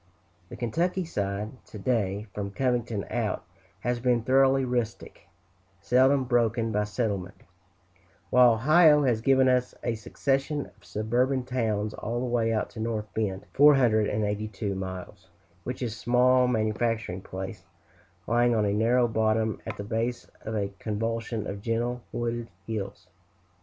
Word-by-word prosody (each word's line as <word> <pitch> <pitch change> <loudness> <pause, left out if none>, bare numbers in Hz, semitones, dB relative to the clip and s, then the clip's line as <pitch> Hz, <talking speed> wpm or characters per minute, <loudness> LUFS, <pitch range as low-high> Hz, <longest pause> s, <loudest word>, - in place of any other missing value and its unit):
The - - -8
Kentucky 175 - -1
side, 105 -3 -4
to - - -10
day, 105 -2 -1
from 100 -1 -4
Covington 120 -2 -1
out, - - -1 0.4
has 120 0 -1
been 120 -1 +1
thoroughly 135 +1 +4
rustic, 120 -3 -3 0.5
seldom 130 +2 +3
broken 115 -2 +1
by 105 0 +1
settlement; 100 -4 -3 0.9
while 125 -2 +7
Ohio 150 +5 +5
has 120 -5 +1
given 130 +1 +4
us 125 -1 +1
a 120 - 0
succession 135 +6 -1
of - - -27
suburban 125 +5 0
towns 110 -4 -1
all 120 +2 -3
the 125 - -2
way 120 -2 +1
out 110 -1 -1
to - - -9
North 110 -2 -3
Bend 100 -3 -2
(482 110 -6 +3
miles), 95 -1 -7 0.4
which 125 +4 -4
is 115 -3 -2
a 115 - -11
small 125 +1 +4
manufacturing 110 -4 -1
place, 95 +1 -7 0.6
lying 120 +1 +3
on 105 -2 +2
a 100 - +1
narrow 120 +3 +3
bottom 110 -1 0
at - - -5
the 100 - -5
base 115 +3 -2 0.2
of 110 - -5
a 100 -2 -1
convolution 115 +1 -2
of 100 -1 -5
gentle, 120 +2 -1
wooded 120 0 -3 0.2
hills. 100 -3 -5
115 Hz, 140 wpm, -27 LUFS, 105-125 Hz, 0.9 s, while